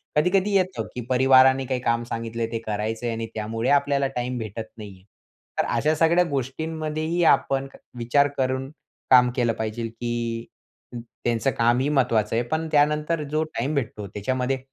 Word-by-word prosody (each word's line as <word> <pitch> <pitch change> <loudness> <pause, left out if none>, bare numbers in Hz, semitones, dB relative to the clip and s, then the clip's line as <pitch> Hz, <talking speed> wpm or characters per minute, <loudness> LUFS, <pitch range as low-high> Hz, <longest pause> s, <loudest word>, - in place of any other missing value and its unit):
कधी-कधी 185 +6 +2
येतं, 185 -1 0
की 125 - -3
परिवाराने 130 +1 +5
काही 130 0 -1
काम 115 -1 0
सांगितलंय 115 -1 -4
ते 115 - -2
करायचं 110 +2 -3
आहे 115 - -1
आणि 115 0 -4
त्यामुळे 115 +2 -2
आपल्याला 140 -1 +2
टाईम 125 0 -2
भेटत 110 0 -5
नाही 105 -2 -8
आहे. 95 - -21 0.6
तर - - +3
अशा 150 +7 +2
सगळ्या 165 +3 +4
गोष्टींमध्येही 155 +4 -2
आपण 135 -3 +3 0.3
विचार 120 +5 +3
करून 130 0 -1 0.4
काम 125 -1 +7
केलं 120 -3 +1
पाहिजे, 110 +1 -3
की 115 0 -4 0.5
त्यांचं 120 +1 -2
कामही 120 +4 +2
महत्वाचं 115 -6 +1
आहे. 120 - +1
पण 160 +6 -2
त्यानंतर 150 +1 +2
जो 155 +1 +1
टाईम 155 -1 -3
भेटतो, 110 -6 -3
त्याच्यामध्ये 125 +7 -2
125 Hz, 155 wpm, -24 LUFS, 115-145 Hz, 0.6 s, काम